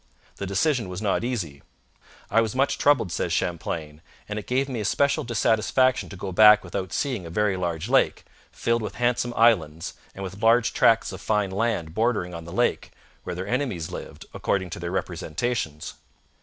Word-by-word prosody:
The 100 - -4
decision 110 - +1
was 90 0 -5
not 105 +1 0
easy. 90 - -3 0.7
'I 115 - +5
was 110 +1 -2
much 135 +2 +1
troubled,' 130 -10 +3
says - - -2
Champlain. 80 -3 -3 0.3
'And 105 0 -3
it 105 - -11
gave 130 +2 +1
me 125 -4 -4
especial 140 +8 +1
dissatisfaction 120 +2 +2
to - - -9
go 95 +1 -5
back 105 +2 +7
without 95 +1 -4
seeing 125 - -2
a - - -7
very 105 +3 +1
large 85 -3 -3
lake, - - +2 0.3
filled 115 0 0
with 105 - -5
handsome 120 0 0
islands 85 -9 +2 0.2
and 100 - -6
with 95 +2 -7
large 115 +1 +4
tracts 115 0 +3
of - - -8
fine 105 -3 0
land 100 -6 -1
bordering 110 -4 0
on 85 -1 -7
the 85 - -9
lake, - - 0 0.4
where 90 - -4
their 90 +2 -5
enemies 120 - -2
lived, - - -8
according 95 -3 -1
to - - -5
their 85 0 -4
representations. 85 -1 -3
105 Hz, 180 wpm, -25 LUFS, 90-120 Hz, 0.7 s, back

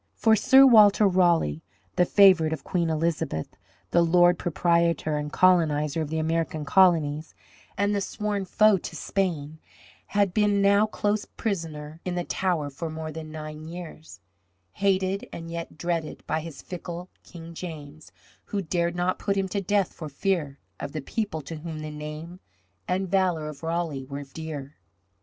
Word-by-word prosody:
For 220 -1 +4
Sir 265 +5 +7
Walter 215 -4 +7
Raleigh, 170 - +2 0.3
the 180 - +4
favourite 185 -6 +5
of 145 -4 -6
Queen 170 -2 -1
Elizabeth, 160 - -2 0.4
the 170 - +4
lord 175 +1 +4
proprietor 170 -1 +1
and 150 0 -3
colonizer 160 -4 +3
of 155 - -3
the 160 - -2
American 160 0 -1
colonies, 160 -4 +3 0.4
and 200 +1 +1
the 200 - 0
sworn 205 0 -3
foe 215 +1 +4
to 165 - -8
Spain, 160 -5 -2 0.5
had 200 -3 +1
been 205 -1 +2
now 200 +2 +4
close 210 0 -1
prisoner 160 -6 -5
in 180 -1 -3
the 175 - -1
Tower 170 -6 -1
for 160 +4 -5
more 155 0 -5
than 155 0 -8
nine 155 0 -7
years, 165 - -10 0.5
hated 195 - 0
and 165 0 -7
yet 170 -2 -6
dreaded 165 -1 -3
by 160 - -1
this 165 -4 -9
fickle 180 0 -7
King 170 -1 -11
James, 155 -3 -9 0.3
who 205 - -3
dared 170 0 -1
not 180 +1 0
put 200 -1 -1
him 195 -1 0
to 200 +1 -2
death 195 0 0
for 155 -3 -7
fear 150 -2 -1 0.2
of 140 - -6
the 155 - -3
people 160 -1 -3
to 160 +3 -7
whom 155 0 -6
the 155 0 -6
name 150 +4 -8 0.5
and 190 +1 -1
valour 180 -5 +1
of 150 -2 -8
Raleigh 165 -5 -2
were 140 0 -5
dear. 145 0 -8
170 Hz, 160 wpm, -26 LUFS, 155-190 Hz, 0.5 s, Sir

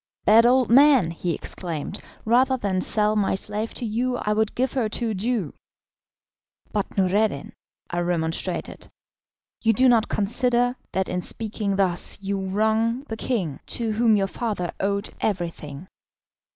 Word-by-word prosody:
"Bad 225 +3 +6
old 255 -1 +3
man," 265 - +6
he 170 +1 -3
exclaimed, 170 +1 -5 0.2
"rather 255 +4 +3
than 195 -5 -1
sell 210 +1 +3
my 200 -2 +1
slave 210 +3 -3
to 245 - -3
you 245 +3 -1
I 210 - -1
would 220 0 0
give 255 +1 0
her 240 -5 0
to 230 +1 -2
a - - -2
Jew." 210 - -2 1.2
"But, 205 -1 -3
Noureddin," 195 -4 +1 0.3
I 175 - -3
remonstrated, 170 -2 -2 0.7
"you 225 0 +3
do 260 +5 +4
not 235 -3 +3
consider 245 +4 +1 0.2
that 190 0 0
in 180 - -2
speaking 210 -1 -2
thus 185 -3 +1
you 200 0 -3
wrong 220 +5 +1
the 225 - -3
king, 195 - -2 0.2
to 230 -2 -1
whom 220 0 +3
your 195 -1 +2
father 195 -3 -3
owed 200 +1 -1
everything." 170 -5 -3
210 Hz, 150 wpm, -24 LUFS, 190-235 Hz, 1.2 s, Bad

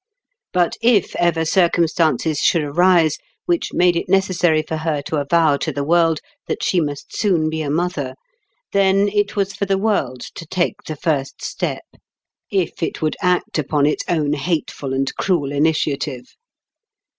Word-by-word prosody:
But 175 -2 +1
if 230 -5 +3
ever 170 -2 +1
circumstances 165 -3 +2
should 165 - +3
arise 165 +1 +3 0.3
which 345 -1 0
made 180 -1 +3
it 170 - -2
necessary 180 -4 +2
for 160 +1 -4
her 155 -2 -1
to 155 - -3
avow 150 +1 +3
to 155 - -2
the 140 0 -3
world 165 0 +2 0.3
that - - -3
she 180 - +2
must 145 -2 -5
soon 170 -7 +1
be 160 0 -2
a 150 - -3
mother, 150 -4 -2 0.6
then 195 0 +3
it 205 0 0
was 200 -1 0
for 200 - -3
the 195 0 +2
world 170 - 0
to 165 - -9
take 190 +3 -1
the 155 - -4
first 140 -3 -2
step, - - -3 0.7
if 190 -4 -1
it 165 - -2
would 155 - 0
act 180 -3 +1
upon 145 0 +1
its 150 - 0
own 150 -4 +1
hateful 150 -3 -2
and 135 0 -1
cruel 165 -8 0
initiative. 145 -3 -1
165 Hz, 160 wpm, -20 LUFS, 150-180 Hz, 0.7 s, if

